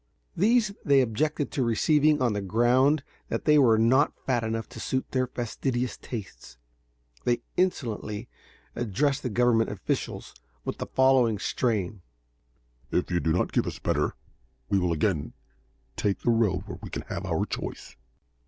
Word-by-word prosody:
These 215 +2 +3
they 140 -2 +5
objected 145 +5 -1
to 135 - 0
receiving 150 +5 +3
on 120 -4 +2
the 105 - -2
ground 125 +8 +3 0.3
that - - -3
they 150 -1 +6
were 115 -5 +5
not 130 +6 +4
fat 120 -3 +1
enough 115 0 -2
to - - -10
suit 130 +3 -2
their 130 -1 +1
fastidious 125 +1 -2
tastes. 100 - -8 0.7
They 120 -1 0
insolently 115 - -1 0.5
addressed 120 +5 0
the 125 - -2
Government 120 0 +3
officials 100 -2 -3 0.3
in - - -1
the - - -4
following 130 -4 +3
strain: 105 -4 -1 0.9
"If 90 - -1
you 90 - +2
do 80 - 0
not 90 - +1
give - - +1
us - - -4
better, - - 0 0.6
we 100 - +4
will 90 -2 0
again 80 -1 0 0.6
take 100 +4 -1
the 120 - +2
road 115 -5 +2
where - - -8
we - - -7
can - - -5
have - - -5
our - - 0
choice." 70 - -6
120 Hz, 155 wpm, -27 LUFS, 105-135 Hz, 0.9 s, they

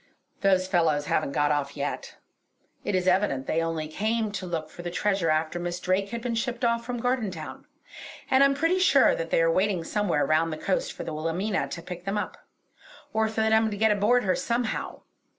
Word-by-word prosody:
"Those 190 -1 +3
fellows 165 -6 +2
haven't 145 -2 0
got 145 0 +2
off 145 -1 -1
yet. 140 - -4 0.7
It 200 - -1
is 180 -1 0
evident 180 -8 +2
that - - -2
they 165 - +2
only 165 -2 -2
came 215 +6 -1
to 195 -2 -5
look 160 -3 -4
for - - -9
the 175 - -4
treasure 195 -1 0
after 155 +2 0
Miss 175 0 -3
Drake 190 +2 0
had 235 +1 -5
been 245 -2 -1
shipped 240 +1 -1
off 235 0 +1
from 245 +1 -4
Gardentown. 220 -10 -3 0.6
And 265 +1 +6
I'm 275 0 +4
pretty 330 +6 +1
sure 280 -7 +5
that 165 0 -3
they 165 - +3
are 165 - +3
waiting 185 -1 +1
somewhere 175 -6 0
round 155 +3 +2
the 155 - -4
coast 185 +4 -1
for - - -7
the 160 - -5
Wilhelmina 170 +7 -1
to 170 - -7
pick 180 0 -8
them 195 +1 -1
up; 210 - -3 0.8
or 220 0 +2
for 220 0 -2
them 220 0 +3
to 205 - -5
get 220 +1 +3
aboard 215 +5 +3
her 185 -1 +2
somehow. 235 -1 -2
190 Hz, 210 wpm, -26 LUFS, 165-220 Hz, 0.8 s, And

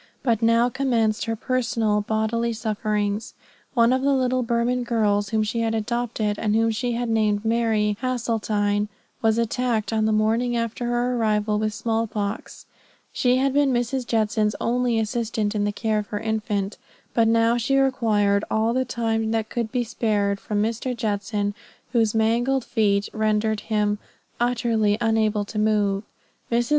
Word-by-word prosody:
But 230 -4 +1
now 230 +1 +4
commenced 235 -4 0
her 225 -1 -1
personal, 230 -3 0
bodily 220 +2 -1
sufferings. 215 0 -2 0.4
One 235 0 +4
of 260 - +1
the 275 0 +2
little 255 -1 +1
Burman 235 +1 0
girls 210 -4 +1
whom 220 -1 +1
she 225 +2 -2
had 225 -1 0
adopted, 220 -2 -2
and 210 -1 +1
whom 225 0 +3
she 240 +2 -2
had 240 +1 -2
named 215 -2 +1
Mary 220 -2 +1
Hasseltine, 215 -5 0 0.3
was 225 0 +2
attacked 230 -2 0
on 220 -1 +1
the 220 - +2
morning 225 +3 +1
after 230 +1 -2
her 240 +1 0
arrival 210 -2 +1
with 215 -1 -1
small 225 0 -1
pox. 205 0 -5 0.5
She 250 0 +2
had 270 +1 +1
been 285 -1 +3
Mrs. 245 +1 -1
Judson's 215 -1 +1
only 245 -1 +1
assistant 220 -1 -1
in 205 -1 0
the 205 - 0
care 215 +1 -1
of 210 - -5
her 205 - -4
infant. 215 -1 -2 0.3
But 230 -1 +3
now 230 +1 +3
she 260 +4 +1
required 215 -7 +2
all 220 +1 +1
the 260 +1 +1
time 225 -2 -1
that 220 -1 -1
could 230 -2 -2
be 250 -1 0
spared 205 -3 0
from 210 0 -1
Mr. 235 +3 -2
Judson, 205 -2 -1 0.4
whose 225 -3 +2
mangled 235 +4 +1
feet 205 -4 +1
rendered 215 0 +1
him 210 -1 0 0.4
utterly 230 -3 +1
unable 220 -2 +1
to 210 +1 -4
move. 205 -2 +2 0.5
Mrs. 235 0 +1
225 Hz, 160 wpm, -23 LUFS, 210-235 Hz, 0.5 s, now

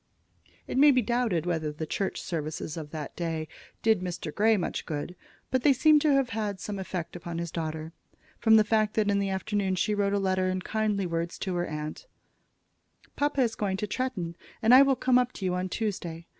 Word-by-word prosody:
It - - -1
may 295 +1 +8
be 255 -3 +4
doubted 225 -8 0
whether 160 -3 -1
the 155 +1 -5
church 195 +5 -2
services 155 -2 -4
of 155 -3 -6
that 155 -1 -6
day 165 -2 -3 0.4
did 220 -3 +4
Mr. 175 -4 -4
Grey 220 +1 +3
much 180 - -3
good; 155 +3 -4 0.4
but 260 - +2
they 280 +2 +5
seemed 300 +3 +5
to 300 - +3
have 270 -2 +2
had 210 -5 -3
some 200 +1 -5
effect 180 -3 -5
upon 170 -1 -6
his 170 -1 -4
daughter, 160 -1 -4 0.5
from 220 -1 +5
the 215 - +7
fact 215 0 +1
that 210 -2 +2
in 200 - +2
the 200 -1 0
afternoon 190 0 -1
she 195 +3 0
wrote 200 -1 +1
a - - +2
letter 185 -1 +1
in 185 0 -2
kindly 215 -3 0
words 170 0 -3
to 190 - -3
her 175 0 -1
aunt: 150 - -6 1.1
"Papa 290 -1 +1
is 235 -3 +2
going 200 -3 -2
to 210 - -2
Tretton, 210 -7 -3 0.3
and 225 +2 +4
I 260 - +10
will 275 -1 +4
come 255 0 +3
up 250 0 0
to 195 - -5
you 180 - +1
on 180 +1 -2
Tuesday. 175 -6 -3
195 Hz, 210 wpm, -28 LUFS, 170-225 Hz, 1.1 s, I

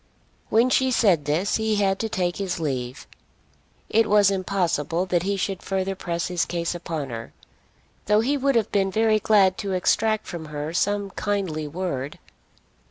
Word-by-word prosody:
When 235 +3 +3
she 260 0 +3
said 190 - +3
this 165 +7 +1
he 220 -1 0
had 195 -1 +1
to 225 - -2
take 180 -4 -1
his 190 -3 -3
leave. 130 -5 -3 0.8
It 225 0 +2
was 205 -1 +5
impossible 180 -3 0
that 175 -2 +1
he 200 +2 -1
should 190 0 -2
further 195 0 -2
press 170 -2 -3
his 180 -2 0
case 170 -1 -2
upon 160 -6 -5
her, 115 -1 -7 0.7
though 210 +1 +4
he 270 +6 +1
would 275 -1 +1
have 225 -2 +1
been 195 -1 +2
very 215 +2 +2
glad 195 -3 +3
to 200 -2 -3
extract 215 +4 +1
from 170 -2 -6
her 150 +1 -5
some 205 +2 0
kindly 190 -8 -2
word. 150 -4 -4
190 Hz, 165 wpm, -24 LUFS, 170-210 Hz, 0.8 s, was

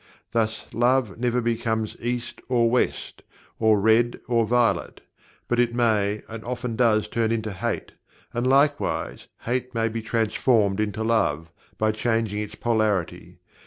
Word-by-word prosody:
Thus 110 -1 -1
Love 120 -3 +1
never 125 0 +1
becomes 115 -2 -1
East 120 0 -4
or 120 -2 +3
West, 125 - -1 0.4
or 110 -2 +4
Red 110 +3 +3
or 115 -2 +2
Violet 120 0 +1 0.5
but 120 - 0
it 120 -1 +2
may 105 -3 +1
and 110 0 -8
often 125 -1 -4
does 110 -3 +3
turn 115 +1 0
into 110 -2 -2
Hate 95 - -3 0.4
and 120 +1 -1
likewise 140 +2 +1
Hate 125 +1 -3
may 115 0 +1
be 115 +1 -4
transformed 110 -2 +1
into 110 +1 -1
Love, 90 -8 0 0.3
by 110 0 +2
changing 110 -1 -1
its 105 -1 -5
polarity. 110 -7 -1
115 Hz, 140 wpm, -24 LUFS, 110-120 Hz, 0.5 s, or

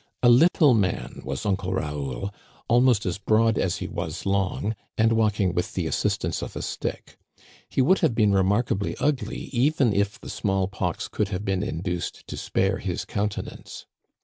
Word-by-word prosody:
A 120 - +7
little 145 +2 +6
man 100 -6 -1
was 70 +6 -4
Uncle 95 -2 0
Raoul, 75 +1 -3 0.3
almost 120 -2 +4
as 90 0 -2
broad 110 +2 +3
as 90 -2 0
he - - -4
was - - -5
long, 100 +2 0 0.2
and 115 +1 +4
walking 105 -5 +2
with 90 -1 -2
the - - -1
assistance - - -1
of - - -6
a - - -4
stick; - - -5 0.5
he 130 - +2
would 185 +8 +4
have 155 -10 +2
been 105 -3 +4
remarka 100 +5 +2
bly 100 +1 -3
ugly 130 -7 -1
even 135 -2 +3
if 100 +1 0
the - - -11
small 95 -2 0
pox 95 -4 -3
could 105 - -1
have 100 +1 -4
been 95 -2 0
induced 90 -3 -3
to - - -6
spare 95 0 0
his 90 -2 -3
countenance. 105 0 -4
100 Hz, 175 wpm, -25 LUFS, 95-115 Hz, 0.5 s, A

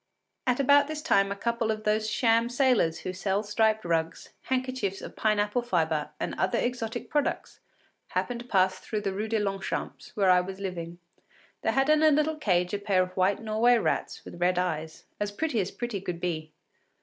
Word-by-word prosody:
At 250 0 +2
about 285 +1 +5
this 305 0 -5
time 195 0 +3
a - - -2
couple 235 +2 -1
of 215 0 -2
those 215 0 +1
sham 230 +1 +2
sailors 245 - +2
who 185 - -4
sell 195 +2 -1
striped 220 0 +1
rugs, 165 -1 -1 0.2
handkerchiefs 255 -7 -1
of - - -9
pine 215 -1 +1
apple 210 +4 +1
fibre 160 -9 0
and - - -2
other 185 - +1
exotic 240 -2 -2
products, 295 -1 -2 0.5
happened 245 -1 -2
to 240 - -10
pass 190 -3 +2
through 210 +2 -4
the 195 -1 -2
Rue 210 +3 -3
de 225 0 0
Longchamps, 195 -2 -3
where 195 -3 +4
I 180 0 +5
was 190 +1 -7
living. 175 -3 -5 0.6
They - - +1
had 270 +2 +2
in 305 0 +4
a 315 - +6
little 305 +1 +2
cage 180 -9 +1
a 205 - 0
pair 200 -3 +2
of 185 0 -8
white 195 +3 +1
Norway 225 +3 +3
rats - - -2
with 175 - -10
red 180 0 +2
eyes, 160 -3 -3
as 205 0 -1
pretty 255 +2 -1
as 195 -1 -1
pretty 235 -4 -4
could 180 -3 -4
be. 160 -3 -3
210 Hz, 195 wpm, -28 LUFS, 185-240 Hz, 0.6 s, a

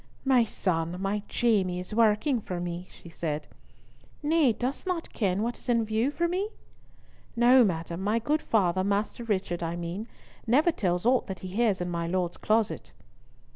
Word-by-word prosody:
"My 260 -3 +5
son, 175 -5 -2
my 195 +2 -1
Jamie, 195 -7 +1
is 180 +3 -7
working 230 +3 +3
for 180 -3 -4
me!" 175 +1 -4
she - - -15
said. 155 -2 -4 0.8
"Nay, 300 -3 +4
dost 255 - -3
not 355 -3 -3
ken 200 -1 0
what 240 +1 -3
is - - -10
in 230 -2 +3
view 220 +4 +1
for 340 +4 0
me?" 375 +4 -1 0.9
"No, 245 +2 +6
madam, 170 -2 -2
my 210 +3 +1
good 295 +7 0
father, 185 -4 +1
Master 205 +4 -1
Richard, 185 -6 -1
I 165 0 -2
mean, 175 +6 -5 0.4
never 295 +9 +4
tells 180 - -1
aught 250 +1 +3
that 190 -2 -6
he 185 - -6
hears 205 -1 +1
in 175 - -2
my 170 -1 -2
Lord's 175 0 -1
closet." 215 0 0
210 Hz, 175 wpm, -28 LUFS, 180-240 Hz, 0.9 s, No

